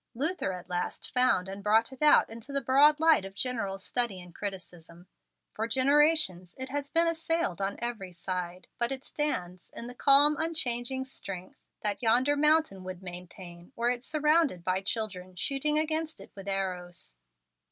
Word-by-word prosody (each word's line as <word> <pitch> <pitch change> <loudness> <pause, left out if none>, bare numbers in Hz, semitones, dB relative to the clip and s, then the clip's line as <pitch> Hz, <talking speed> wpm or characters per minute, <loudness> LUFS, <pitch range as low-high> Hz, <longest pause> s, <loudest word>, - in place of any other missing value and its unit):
Luther 295 - 0
at 180 -1 -9
last 180 0 -4
found 250 -7 +3
and 195 +1 -8
brought 220 +4 +2
it 265 - -14
out 300 -1 +6
into 230 +4 -8
the 280 - 0
broad 280 +4 +5
light 320 -8 +5
of 195 0 -9
general 205 -4 -2
study 205 0 -2
and 180 -1 -13
criticism. 175 -4 -8 0.5
For 220 +1 -2
generations 265 - +3
it 260 0 -6
has 285 0 -3
been 335 +2 +4
assailed 330 - 0
on 195 +1 -1
every 225 -6 -4
side, 180 0 -5
but 235 +1 +1
it 270 0 -4
stands 180 -12 -3
in 235 - -5
the 245 - -8
calm, 285 +3 +6
unchanging 265 -5 -1
strength 190 -8 -7 0.2
that 205 0 -1
yonder 250 +5 +3
mountain 300 -9 +2
would 185 0 -8
maintain, 175 +1 -10
were 240 +1 +1
it 245 0 -4
surrounded 305 - +1
by 185 +1 0
children 190 -3 -3
shooting 280 - 0
against 315 0 0
it - - -12
with 195 0 -11
arrows. 180 - -3
230 Hz, 165 wpm, -29 LUFS, 185-285 Hz, 0.5 s, out